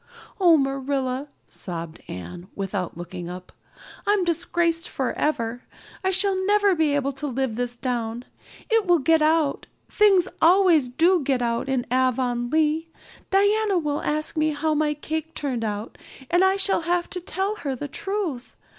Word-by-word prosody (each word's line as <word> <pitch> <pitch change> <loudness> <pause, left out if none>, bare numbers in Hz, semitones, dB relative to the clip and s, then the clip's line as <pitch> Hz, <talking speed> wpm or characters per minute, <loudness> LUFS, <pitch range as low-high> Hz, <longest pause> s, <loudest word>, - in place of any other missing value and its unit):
"Oh, 345 -4 +6
Marilla," 270 -1 -1 0.2
sobbed 170 -2 -7
Anne, 90 - -8
without 195 -3 -3
looking 175 0 -7
up, 180 0 -9 0.6
"I'm 410 -2 +3
disgraced 335 -1 0
forever. 250 -3 -1 0.4
I 380 - +2
shall 380 +1 +3
never 410 -1 +4
be 315 -4 +2
able 280 -1 0
to 280 +2 -5
live 260 -3 -2
this 245 0 -2
down. 240 -1 -3 0.4
It 450 -4 +2
will 350 -1 +5
get 320 +2 +3
out 310 -2 +1 0.2
things 395 -4 +4
always 340 -6 +5
do 335 +7 +3
get 265 -3 0
out 235 +3 -1
in 260 -2 0
Avonlea. 260 +5 +1 0.4
Diana 405 +1 +3
will 300 -3 -1
ask 305 +2 -2
me 310 -1 +1
how 310 +2 0
my 300 0 +1
cake 315 +2 -5
turned 260 -6 -2
out 210 0 -4 0.3
and 350 +2 +4
I 380 0 +4
shall 390 -2 +1
have 345 +1 0
to 360 - -5
tell 385 +4 -2
her 275 -8 -3
the 290 +4 -5
truth. 385 -7 -4
300 Hz, 155 wpm, -24 LUFS, 245-350 Hz, 0.6 s, Oh